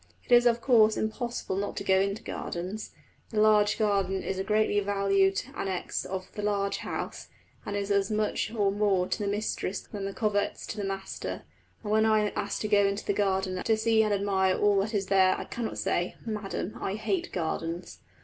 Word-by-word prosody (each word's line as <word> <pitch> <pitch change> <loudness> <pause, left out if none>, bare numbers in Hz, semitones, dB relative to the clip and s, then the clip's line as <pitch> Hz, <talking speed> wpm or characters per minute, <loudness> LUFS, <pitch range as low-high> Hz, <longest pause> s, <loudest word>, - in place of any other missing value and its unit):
It - - -14
is 240 0 +7
of 235 0 +2
course 220 -4 +5
impossible 220 -3 -2
not 200 +1 -3
to - - -3
go 190 -1 +4
into 200 +3 -1
gardens. 185 +5 -5 0.4
The 215 - -1
large 210 -1 +4
garden 195 -3 +1
is 190 - -3
the 190 - -1
greatly 210 0 +2
valued 195 -1 +2
annexe 190 -2 -3
of 185 0 -4
the 210 - -5
large 200 -1 0
house, - - -5 0.4
and 205 - -2
is 200 0 -2
as 200 -1 +2
much 215 0 0
or 205 -4 +1
more 200 -3 +2
to - - -2
the 205 - -1
mistress 205 -1 -2
than 200 -2 -6
the 195 - -3
coverts 210 -3 -1
to - - -6
the 205 - -2
master; 195 0 -4 0.4
and 210 - -3
when 220 +1 +4
I 215 -1 +4
am - - -13
asked 200 - -2
to 215 - -1
go 205 -1 +4
into 200 +1 -3
the - - +1
garden 190 -2 0
to 220 -1 +2
see 220 0 +3
and 215 -1 +1
admire 195 -2 +2
all 205 -1 +3
that 210 +3 -1
is 200 -1 0
there, 190 -1 +4
I - - -4
cannot 235 -2 -5
say, 175 +1 -1
"Madam, 210 -2 -4
I 195 - -2
hate 340 - -2
gardens." 170 0 -3
205 Hz, 205 wpm, -28 LUFS, 195-215 Hz, 0.4 s, is